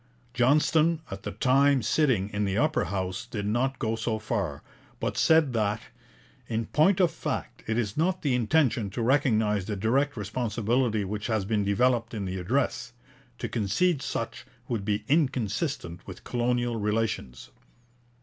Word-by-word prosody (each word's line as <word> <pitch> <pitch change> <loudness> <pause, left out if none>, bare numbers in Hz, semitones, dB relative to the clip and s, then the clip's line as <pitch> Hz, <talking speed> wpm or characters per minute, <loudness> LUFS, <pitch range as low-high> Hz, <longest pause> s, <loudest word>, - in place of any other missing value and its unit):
Johnston, 155 +6 +3
at 95 0 -6
the - - -5
time 135 +4 +3
sitting 110 -4 +2
in 105 0 -1
the 100 0 -1
Upper 155 +4 +2
House, 95 +4 -3
did 105 -4 -4
not 125 +6 0
go 110 0 -1
so 115 0 -2
far, 100 - -3 0.4
but - - -2
said 160 -5 +4
that 105 -1 0 0.7
'in 115 0 -2
point 175 - +3
of 180 -3 +4
fact - - -5
it 110 +1 0
is 105 -4 -1
not 180 +4 0
the 140 -4 +1
intention 125 -3 +2
to 110 +5 -4
recognize 110 -6 +2
the 105 0 -3
direct 125 +8 +1
responsibility 115 +1 0
which 105 +3 -4
has 110 -4 0
been 105 0 0
developed 115 +3 +1
in 100 -2 -3
the 95 0 -3
address. 130 +4 -1 0.4
To - - -3
concede 130 - +1
such - - -4 0.2
would 115 -4 -2
be 105 +1 -1
inconsistent 130 - -1
with 95 -2 -9
colonial 120 -1 0
relations.' 105 - -2
115 Hz, 155 wpm, -27 LUFS, 105-135 Hz, 0.7 s, said